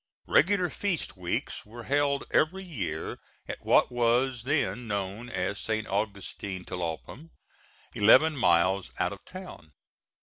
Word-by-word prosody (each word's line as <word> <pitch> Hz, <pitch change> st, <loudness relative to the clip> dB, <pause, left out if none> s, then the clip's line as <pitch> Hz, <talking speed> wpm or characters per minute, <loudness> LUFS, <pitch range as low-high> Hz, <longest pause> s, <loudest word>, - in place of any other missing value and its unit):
Regular 180 Hz, +2 st, +3 dB
feast 195 Hz, -6 st, -2 dB
weeks 90 Hz, -2 st, -3 dB
were 115 Hz, +3 st, -10 dB
held 140 Hz, +1 st, +1 dB
every 185 Hz, +5 st, +2 dB
year 95 Hz, -, -4 dB, 0.3 s
at -, -, -6 dB
what -, -, +4 dB
was 120 Hz, +1 st, +1 dB
then 130 Hz, -4 st, 0 dB
known 100 Hz, +3 st, -3 dB
as 100 Hz, -1 st, -2 dB
St. 110 Hz, -1 st, -2 dB
Augustin 100 Hz, -2 st, -3 dB
Tlalpam, 90 Hz, -, -5 dB, 0.6 s
eleven 150 Hz, +9 st, +6 dB
miles 90 Hz, -, +3 dB
out -, -, 0 dB
of -, -, -12 dB
town. 80 Hz, -1 st, -10 dB
115 Hz, 125 wpm, -28 LUFS, 95-140 Hz, 0.6 s, eleven